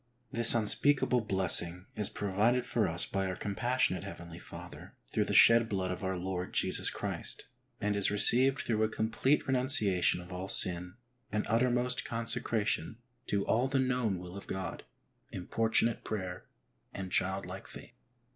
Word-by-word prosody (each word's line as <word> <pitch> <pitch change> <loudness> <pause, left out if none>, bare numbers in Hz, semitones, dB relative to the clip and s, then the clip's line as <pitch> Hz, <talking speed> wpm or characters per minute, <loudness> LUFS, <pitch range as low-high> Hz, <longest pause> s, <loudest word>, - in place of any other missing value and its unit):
This 120 0 +2
unspeakable 125 +3 +2
blessing 90 -3 +4
is 105 - 0
provided 105 +5 0
for 110 -4 -1
us 85 +2 -1
by 95 -1 -3
our 90 - -4
compassionate 105 -2 -1
heavenly 85 -1 -10
Father - - -12 0.2
through - - 0
the - - -3
shed 115 0 +6
blood 95 -2 -2
of 90 - -6
our 95 0 -2
Lord 90 0 -5
Jesus - - +2
Christ, - - -4 0.3
and 105 0 -1
is 100 -1 +3
received 130 +6 +4
through 110 -2 -1
a 110 - +1
complete 115 +6 0
renunciation 125 -10 +2
of 90 +1 -11
all 90 +1 -5
sin, 90 -1 +3 0.4
an 105 +1 -2
uttermost 125 +2 +1
consecration 115 -4 -1 0.3
to 100 -1 -1
all 120 +4 +1
the 135 +1 -1
known 125 -6 -1
will 90 +1 -10
of 100 - -10
God, 95 -1 -6 0.5
importunate 115 +4 0
prayer, 95 -4 -6 0.5
and 95 -1 -6
child 95 +1 0
like - - -9
faith. - - -12
105 Hz, 155 wpm, -30 LUFS, 95-120 Hz, 0.5 s, shed